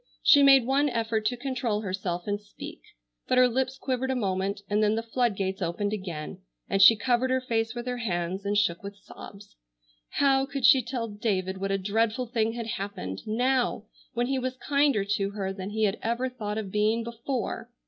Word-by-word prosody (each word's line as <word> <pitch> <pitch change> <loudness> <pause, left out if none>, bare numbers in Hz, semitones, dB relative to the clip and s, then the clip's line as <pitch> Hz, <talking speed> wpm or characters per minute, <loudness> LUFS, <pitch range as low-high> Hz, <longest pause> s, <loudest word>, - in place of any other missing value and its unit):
She 285 - +7
made 270 -3 +7
one 280 +3 +2
effort 225 -3 -1
to 245 - -1
control 240 -4 -2
herself 185 -3 -3
and 205 0 -2
speak, 205 0 -10 0.5
but 255 - +2
her 255 0 +7
lips 260 +2 -1
quivered 260 0 -2
a 265 - 0
moment, 200 -2 -1
and 205 +1 +1
then 215 0 +3
the 225 - -2
flood 235 -1 0
gates 190 0 -3
opened 190 +4 -1
again, 175 -7 -5 0.3
and 195 - +1
she 225 +4 +9
covered 245 +3 +1
her 260 0 +2
face 225 -2 -1
with 240 0 -5
her 250 -1 -3
hands 185 -3 -2
and 205 +1 0
shook 170 -5 +1
with 200 0 -8
sobs. 200 +1 -13 0.5
How 270 -1 +2
could 275 -3 -2
she 265 0 +7
tell 240 -1 -4
David 195 -3 -2
what 195 +1 -2
a 195 - +1
dreadful 220 +5 0
thing 225 -1 0
had 235 -1 -4
happened, 195 - -5
now, 245 0 +1 0.3
when 240 +1 +1
he 265 +1 -1
was 255 0 -3
kinder 280 -7 +2
to 195 0 -1
her 195 -2 -4
than 190 0 -6
he 220 +1 -1
had 205 0 +1
ever 235 +3 -1
thought 215 -4 -5
of 205 -3 -4
being 215 +3 +1
before! 235 +1 -4
225 Hz, 200 wpm, -27 LUFS, 200-250 Hz, 0.5 s, she